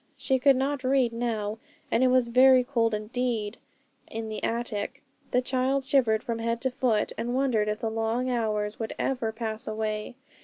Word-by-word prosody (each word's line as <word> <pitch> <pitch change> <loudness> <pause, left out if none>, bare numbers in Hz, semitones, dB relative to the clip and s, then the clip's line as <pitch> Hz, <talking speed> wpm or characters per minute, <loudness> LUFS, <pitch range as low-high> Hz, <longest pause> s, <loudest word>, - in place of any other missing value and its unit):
She 265 -1 +1
could 275 +1 +5
not 270 +1 -1
read 255 -2 +2
now, 220 -2 -2 0.3
and 235 - +3
it - - +5
was 250 -1 +3
very 255 +1 +6
cold 230 -4 +1
indeed 220 0 -2 0.5
in 225 0 -5
the 215 - -5
attic. 235 +3 -3 0.3
The 250 - +2
child 260 +2 0
shivered 240 -6 +2
from 230 -1 -3
head 230 0 -1
to 260 - 0
foot, 245 -5 0
and 240 +1 -2
wondered 250 -6 +1
if 210 0 -2
the 225 - -1
long 225 +3 -1
hours 215 -4 -1
would 225 - -4
ever 245 -4 -1
pass 220 -1 -5
away. 215 +1 -3
235 Hz, 180 wpm, -27 LUFS, 220-255 Hz, 0.5 s, very